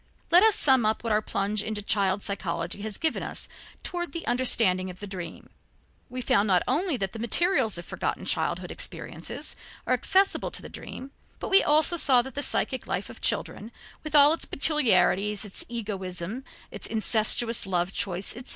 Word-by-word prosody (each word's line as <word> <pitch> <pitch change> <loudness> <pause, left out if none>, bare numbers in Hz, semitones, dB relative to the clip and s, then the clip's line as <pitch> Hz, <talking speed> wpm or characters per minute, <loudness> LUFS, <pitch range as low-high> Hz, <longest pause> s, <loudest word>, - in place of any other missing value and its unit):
Let 350 +2 +7
us 440 0 +5
sum 265 -4 +4
up 215 +1 0
what 230 -2 0
our 210 - +2
plunge 205 0 -1
into 215 -1 -4
child 200 -1 +1
psychology 175 -1 -3
has 215 -1 -5
given 320 0 -1
us - - -3 0.4
toward 345 -4 -4
the 335 - -6
understanding 225 -7 +2
of 180 0 -10
the 205 - -6
dream. 180 -4 -8 0.6
We 255 +1 -5
found 210 -3 +2
not 185 -3 +3
only 315 +2 0
that 195 -4 -3
the 225 - -7
materials 240 - +2
of 170 - -7
forgotten - - -4
childhood - - -2
experiences - - -4 0.3
are - - +1
accessible 390 +1 +2
to - - -3
the - - -9
dream, 270 +1 -9 0.3
but - - -6
we 390 - +6
saw - - -3
also 300 -4 +4
that 265 - -9
the 285 - -2
psychic 260 -1 -1
life - - -3
of - - -14
children, 220 +3 -1 0.3
with 310 -1 -4
all 290 +1 +8
its 330 - -1
peculiarities, 220 - +1
its 200 - -3
egoism, 200 0 -5 0.3
its - - -4
incestuous 220 0 +2
love 180 0 -1
choice, 195 0 0
etc. 245 +2 -10
220 Hz, 180 wpm, -26 LUFS, 195-275 Hz, 0.6 s, all